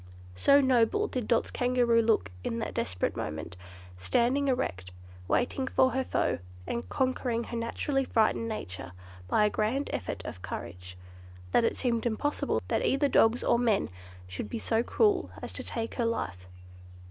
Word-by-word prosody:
So 280 Hz, -, +5 dB
noble 260 Hz, -, +3 dB
did 250 Hz, -, -3 dB
Dot's 235 Hz, -, +2 dB
Kangaroo 245 Hz, -2 st, +3 dB
look 220 Hz, -, +1 dB
in 230 Hz, -, -2 dB
that 225 Hz, -, -3 dB
desperate 90 Hz, -1 st, -1 dB
moment, 80 Hz, +3 st, -5 dB, 0.4 s
standing 240 Hz, -, +2 dB
erect, 95 Hz, -, -1 dB, 0.4 s
waiting 260 Hz, -, 0 dB
for 260 Hz, 0 st, +3 dB
her 265 Hz, +1 st, 0 dB
foe, -, -, 0 dB, 0.3 s
and 235 Hz, -, -4 dB
conquering 255 Hz, -3 st, 0 dB
her 235 Hz, -, -6 dB
naturally 270 Hz, +4 st, -1 dB
frightened 230 Hz, -1 st, +1 dB
nature 90 Hz, -, -6 dB, 0.3 s
by 210 Hz, -, +3 dB
a -, -, +3 dB
grand 245 Hz, +7 st, -1 dB
effort 90 Hz, -, -4 dB
of 90 Hz, -, -7 dB
courage, 90 Hz, +1 st, -7 dB, 0.5 s
that -, -, +4 dB
it 230 Hz, -, +1 dB
seemed 240 Hz, -2 st, 0 dB
impossible 290 Hz, +6 st, -1 dB
that -, -, 0 dB
either 280 Hz, +2 st, +2 dB
dogs 230 Hz, -2 st, +4 dB
or 235 Hz, -, +3 dB
men 225 Hz, -5 st, +2 dB, 0.4 s
should 95 Hz, +3 st, -5 dB
be -, -, -3 dB
so 225 Hz, -, +1 dB
cruel 410 Hz, -, +2 dB
as -, -, -5 dB
to -, -, -5 dB
take 230 Hz, -1 st, -4 dB
her 240 Hz, -, -1 dB
life. 95 Hz, -, -3 dB
230 Hz, 160 wpm, -29 LUFS, 200-260 Hz, 0.5 s, So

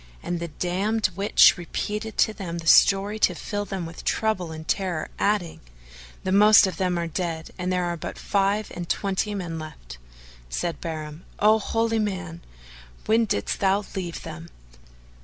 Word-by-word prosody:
And 175 Hz, -1 st, -2 dB
the 170 Hz, -, -4 dB
damned 190 Hz, +7 st, -1 dB
witch 195 Hz, -1 st, +5 dB
repeated 210 Hz, +5 st, -4 dB
to 220 Hz, -, +3 dB
them 175 Hz, -5 st, -5 dB
the 165 Hz, -, -7 dB
story 200 Hz, +5 st, +5 dB
to 180 Hz, -, +3 dB
fill 205 Hz, +4 st, -4 dB
them 190 Hz, -4 st, -4 dB
with 165 Hz, 0 st, -9 dB
trouble 185 Hz, -7 st, 0 dB
and 160 Hz, 0 st, -8 dB
terror, 180 Hz, -5 st, -1 dB
adding, 200 Hz, -5 st, 0 dB, 0.6 s
"The 185 Hz, -, -1 dB
most 210 Hz, +2 st, +7 dB
of 185 Hz, -3 st, -3 dB
them 180 Hz, -2 st, 0 dB
are 170 Hz, -, -1 dB
dead, 165 Hz, -1 st, -4 dB
and 180 Hz, 0 st, -1 dB
there 180 Hz, -1 st, +1 dB
are 175 Hz, 0 st, -2 dB
but -, -, -6 dB
five 200 Hz, +1 st, 0 dB
and 175 Hz, -1 st, -6 dB
twenty 200 Hz, +1 st, -1 dB
men 170 Hz, -4 st, -4 dB
left." 60 Hz, -, -10 dB, 0.5 s
Said 170 Hz, -, -3 dB
Bahram, 155 Hz, -1 st, -6 dB
"O 215 Hz, +1 st, +5 dB
holy 225 Hz, +1 st, 0 dB
man! 185 Hz, -5 st, -3 dB, 0.6 s
when 225 Hz, +1 st, +3 dB
didst 205 Hz, -1 st, -2 dB
thou 200 Hz, +1 st, +2 dB
leave 175 Hz, -3 st, -4 dB
them?" 165 Hz, +1 st, -8 dB
185 Hz, 165 wpm, -25 LUFS, 170-205 Hz, 0.6 s, most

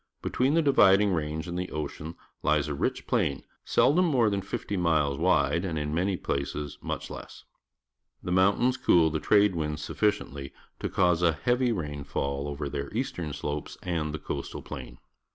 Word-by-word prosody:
Be -, -, -3 dB
tween 135 Hz, +4 st, +2 dB
the 165 Hz, -, +3 dB
Dividing 105 Hz, -8 st, +5 dB
Range 80 Hz, +1 st, -2 dB
and 90 Hz, +1 st, -3 dB
the 90 Hz, -, -3 dB
ocean 75 Hz, +2 st, -5 dB, 0.3 s
lies 75 Hz, -1 st, +2 dB
a 75 Hz, -, -2 dB
rich 70 Hz, -, -2 dB
plain, 70 Hz, -, 0 dB, 0.2 s
seldom 180 Hz, +6 st, +3 dB
more 125 Hz, -9 st, +3 dB
than 100 Hz, -1 st, 0 dB
fifty 100 Hz, +1 st, -5 dB
g 90 Hz, -, -1 dB
ules 75 Hz, -5 st, +2 dB
wide 85 Hz, -2 st, +2 dB
a 95 Hz, -, -2 dB
nd 80 Hz, -, -2 dB
in 75 Hz, 0 st, -2 dB
many 90 Hz, +3 st, 0 dB
places 70 Hz, 0 st, -3 dB
much -, -, -4 dB
less. -, -, -9 dB, 0.8 s
The 90 Hz, -, -3 dB
jnountains. 100 Hz, +8 st, +3 dB
cool 80 Hz, -8 st, +4 dB
Jhe 80 Hz, -, -2 dB
trade 105 Hz, -2 st, +4 dB
winds 75 Hz, -1 st, -3 dB
suffi 105 Hz, -, +2 dB
ciently 70 Hz, -9 st, -6 dB, 0.3 s
to -, -, -2 dB
cause 90 Hz, -2 st, +2 dB
a 85 Hz, -2 st, +4 dB
heavy 120 Hz, -, +1 dB
rainfall 70 Hz, -5 st, -3 dB
over 70 Hz, 0 st, -4 dB
their 70 Hz, 0 st, -4 dB
eastern 115 Hz, -, -2 dB
slopes 75 Hz, +1 st, -4 dB
and 80 Hz, -4 st, -1 dB
the 80 Hz, -, -3 dB
coastal -, -, -5 dB
plain. -, -, -8 dB
85 Hz, 185 wpm, -28 LUFS, 75-100 Hz, 0.8 s, Dividing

